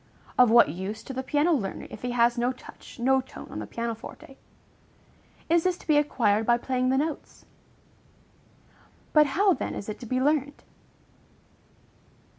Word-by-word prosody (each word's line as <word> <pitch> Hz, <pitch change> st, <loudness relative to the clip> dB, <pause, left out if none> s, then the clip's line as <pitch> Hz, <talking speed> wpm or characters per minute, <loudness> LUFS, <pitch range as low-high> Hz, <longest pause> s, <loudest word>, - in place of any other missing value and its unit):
of 250 Hz, -2 st, +6 dB
what 235 Hz, -7 st, +6 dB
use 190 Hz, +7 st, -5 dB
to 270 Hz, -, -7 dB
the 260 Hz, -, -3 dB
piano 290 Hz, +5 st, +1 dB
learner, 205 Hz, -10 st, -3 dB
if -, -, -9 dB
he 245 Hz, -, -3 dB
has 240 Hz, 0 st, +3 dB
no 245 Hz, +1 st, 0 dB
touch, 255 Hz, -, -13 dB
no 265 Hz, +2 st, +2 dB
tone 260 Hz, -, -11 dB
on -, -, -5 dB
the 105 Hz, -, -6 dB
piano 230 Hz, -, -3 dB
forte. 225 Hz, +4 st, -12 dB, 1.1 s
Is 335 Hz, 0 st, +3 dB
this 365 Hz, -1 st, 0 dB
to -, -, -17 dB
be 305 Hz, -, +3 dB
acquired 225 Hz, -8 st, +2 dB
by 235 Hz, +1 st, +3 dB
playing 255 Hz, +1 st, -1 dB
the 265 Hz, -, +2 dB
notes? 305 Hz, +2 st, -4 dB, 1.7 s
But 300 Hz, -1 st, +6 dB
how 385 Hz, +7 st, +3 dB
then -, -, -4 dB
is 200 Hz, -, -6 dB
it 210 Hz, -, -6 dB
to 240 Hz, -, -9 dB
be 255 Hz, +3 st, 0 dB
learned? 285 Hz, +1 st, 0 dB
255 Hz, 170 wpm, -26 LUFS, 235-290 Hz, 1.7 s, of